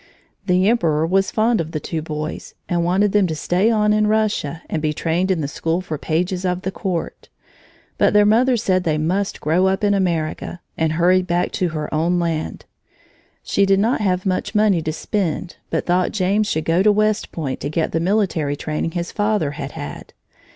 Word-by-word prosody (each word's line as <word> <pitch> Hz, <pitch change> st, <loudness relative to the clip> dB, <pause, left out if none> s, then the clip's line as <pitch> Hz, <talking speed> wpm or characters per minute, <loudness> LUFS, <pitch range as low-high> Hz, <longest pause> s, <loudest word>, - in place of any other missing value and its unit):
The 180 Hz, +1 st, +3 dB
emperor 165 Hz, -9 st, +2 dB
was 195 Hz, +3 st, +2 dB
fond 225 Hz, -2 st, +2 dB
of 160 Hz, 0 st, -7 dB
the 155 Hz, -, -1 dB
two 160 Hz, +2 st, -4 dB
boys 155 Hz, 0 st, -6 dB
and 175 Hz, -1 st, 0 dB
wanted 190 Hz, +4 st, +2 dB
them 205 Hz, -2 st, +3 dB
to 160 Hz, -, -3 dB
stay 180 Hz, +7 st, +1 dB
on 210 Hz, -2 st, +3 dB
in 215 Hz, 0 st, +2 dB
Russia 210 Hz, -7 st, 0 dB
and 160 Hz, -, -2 dB
be 155 Hz, 0 st, 0 dB
trained 170 Hz, +5 st, -1 dB
in 180 Hz, -4 st, +1 dB
the 145 Hz, -, -2 dB
school 165 Hz, +4 st, -1 dB
for 160 Hz, -5 st, -5 dB
pages 180 Hz, +4 st, -1 dB
of 180 Hz, 0 st, -1 dB
the 190 Hz, -, -2 dB
Court. 180 Hz, -3 st, -4 dB, 0.7 s
But -, -, +4 dB
their 210 Hz, 0 st, +5 dB
mother 240 Hz, +4 st, +4 dB
said 185 Hz, -4 st, +1 dB
they 155 Hz, -3 st, 0 dB
must 185 Hz, +6 st, -1 dB
grow 175 Hz, +5 st, +2 dB
up 190 Hz, +3 st, 0 dB
in 205 Hz, 0 st, +3 dB
America 175 Hz, -3 st, -1 dB, 0.2 s
and 160 Hz, -1 st, 0 dB
hurried 180 Hz, +2 st, +3 dB
back 175 Hz, +1 st, 0 dB
to 180 Hz, -, -1 dB
her 155 Hz, -1 st, -4 dB
own 165 Hz, +3 st, +1 dB
land. 165 Hz, -2 st, -2 dB, 0.8 s
She 200 Hz, -, +1 dB
did 195 Hz, 0 st, +3 dB
not 225 Hz, +3 st, +1 dB
have 185 Hz, -2 st, 0 dB
much 185 Hz, +2 st, -1 dB
money 210 Hz, -5 st, +3 dB
to 155 Hz, -, -2 dB
spend 175 Hz, +1 st, -3 dB
but -, -, -1 dB
thought 180 Hz, +1 st, +1 dB
James 205 Hz, +2 st, +1 dB
should 155 Hz, -5 st, -1 dB
go 165 Hz, +2 st, +2 dB
to 210 Hz, +2 st, +5 dB
West 215 Hz, +1 st, +1 dB
Point 140 Hz, -6 st, -4 dB
to 145 Hz, -, -3 dB
get 160 Hz, +1 st, -1 dB
the 165 Hz, -, 0 dB
military 170 Hz, -6 st, 0 dB
training 155 Hz, +2 st, -3 dB
his 170 Hz, -1 st, -3 dB
father 205 Hz, -8 st, 0 dB
had 140 Hz, -1 st, -6 dB
had. 75 Hz, -, -8 dB
180 Hz, 200 wpm, -20 LUFS, 160-200 Hz, 0.8 s, their